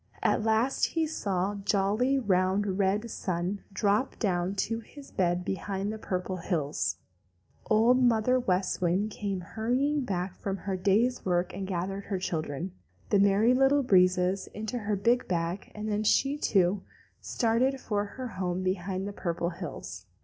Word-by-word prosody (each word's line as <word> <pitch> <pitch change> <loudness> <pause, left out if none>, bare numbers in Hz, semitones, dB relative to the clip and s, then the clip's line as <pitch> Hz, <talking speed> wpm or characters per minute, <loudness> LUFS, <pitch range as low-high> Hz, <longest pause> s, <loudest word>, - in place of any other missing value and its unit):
At - - +2
last 225 +4 +2
he 325 -1 0
saw 200 - -1
jolly, 205 +6 +1
round, 190 -3 +1
red 200 +2 +2
Mr. 235 - -7
Sun 180 +2 -2
drop 205 +5 +1
down 185 -2 0
to 225 +3 -1
his 275 +5 -13
bed 180 -1 0
behind 195 +2 -2
the 220 - -7
Purple 185 -1 -3
Hills. 160 -4 -1 0.7
Old 235 +4 +5
Mother 245 +1 +3
West 185 -6 0
Wind 185 +5 +1
came 200 -3 -3
hurrying 250 - 0
back 185 -4 -2
from 195 -1 -3
her 195 -1 -3
day's 210 +7 +2
work 175 0 0
and 190 0 -4
gathered 195 +2 -3
her 195 - -2
children, 165 -1 -3 0.4
the 205 - +5
Merry 200 +4 +4
Little 270 +2 +4
Breezes, 185 -3 +3
into 220 +3 -3
her 210 -1 -1
big 235 +5 +2
bag, 170 +2 -2
and 210 0 -4
then 210 0 0
she, 270 +6 +3
too, 195 -8 +2 0.4
started 255 +3 +1
for 205 -4 -1
her 250 +5 -6
home 185 -3 -3
behind 185 +1 -2
the 205 - -5
Purple 170 -2 -2
Hills. 145 - -7
200 Hz, 155 wpm, -29 LUFS, 185-225 Hz, 0.7 s, Old